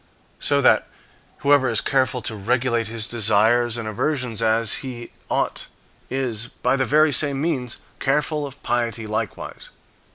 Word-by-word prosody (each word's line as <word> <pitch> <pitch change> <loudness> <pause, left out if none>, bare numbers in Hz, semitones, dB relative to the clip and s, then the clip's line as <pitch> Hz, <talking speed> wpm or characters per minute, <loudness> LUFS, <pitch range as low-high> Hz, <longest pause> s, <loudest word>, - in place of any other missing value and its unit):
So - - +2
that, - - +4 0.5
whoever 140 -2 +4
is - - +3
careful 130 -2 +1
to 110 - -2
regulate 120 +2 0
his 110 -1 -2
desires 115 +2 +2
and 115 -2 -4
aversions 125 0 -2
as 115 0 +2
he 120 -3 -7 0.2
ought, - - -1 0.4
is, 120 -4 -2
by 125 +2 -1
the 130 -1 0
very 155 0 +4
same 140 +1 +2
means, 135 -7 -2 0.2
careful 150 +1 0
of 140 0 -14
piety 115 -2 -1
likewise. 110 0 -5
120 Hz, 140 wpm, -22 LUFS, 115-135 Hz, 0.5 s, that